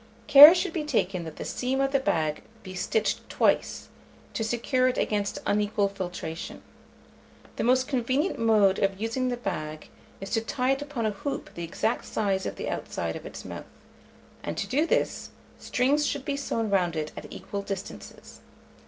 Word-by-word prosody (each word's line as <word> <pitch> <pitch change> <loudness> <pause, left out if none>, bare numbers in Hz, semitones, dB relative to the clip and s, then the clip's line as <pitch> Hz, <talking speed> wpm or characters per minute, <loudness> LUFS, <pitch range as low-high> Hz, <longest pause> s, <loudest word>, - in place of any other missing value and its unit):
Care 295 +3 +11
should 370 +2 -1
be 320 - -2
taken 195 - -1
that 160 - -8
the - - -6
seam 260 +2 -2
of 275 0 +1
the 275 - +3
bag 155 - 0 0.2
be 185 - -8
stitched 195 +4 -1
twice, - - +1 0.5
to 225 - -2
secure 240 +3 +1
it 255 - 0
against 205 -1 -1
unequal 205 0 +1
filtration. 180 -4 -6 0.9
The - - -1
most 255 +2 +3
convenient 265 +4 0
mode 215 -4 +4
of 195 -1 0
using 230 +4 -1
the 245 -1 -1
big 155 -9 -5 0.3
is 195 - -7
to 225 - +1
tie 250 +3 0
it 270 +1 0
upon 285 -6 -3
a 215 - +1
hoop 240 +8 -5
the 170 - -6
exact 215 +7 -1
size 195 -3 -1
of - - -5
the - - -5
outside - - -3
of - - -7
its - - -9
mouth; - - -7 0.8
and, - - -5
to - - -1
do 300 +6 +1
this, - - 0 0.3
strings 285 +4 +1
should 285 -1 -3
be 285 -2 -1
sewn 230 -6 -2
round 180 -4 +2
it 155 -1 -3
at - - -8
equal 200 - -6
distances. 195 0 -8
225 Hz, 180 wpm, -27 LUFS, 195-265 Hz, 0.9 s, Care